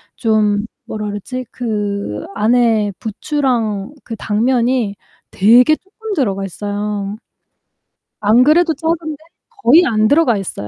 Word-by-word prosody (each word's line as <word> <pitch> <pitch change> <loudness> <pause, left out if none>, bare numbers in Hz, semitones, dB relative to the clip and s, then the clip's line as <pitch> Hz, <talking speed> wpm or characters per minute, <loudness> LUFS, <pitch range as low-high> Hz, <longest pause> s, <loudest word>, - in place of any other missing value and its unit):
좀 215 -2 +1 0.2
뭐라 210 -1 -5
그러지? 205 +5 -5
그 205 - -3
안에 225 -2 +2
부추랑 235 -1 -2
그 230 - -6
당면이 230 0 0 0.4
되게 245 +9 +5
쪼끔 425 +4 -8
들어가 200 - -1
있어요. 205 +1 -4 1.0
안 220 +4 +4
그래도 320 +3 +3
작은데 320 +1 -2 0.5
거의 310 +9 +6
안 215 -3 +2
들어가 285 -5 +3
있어요. 170 - -6
225 Hz, 235 characters per minute, -17 LUFS, 205-265 Hz, 1.0 s, 거의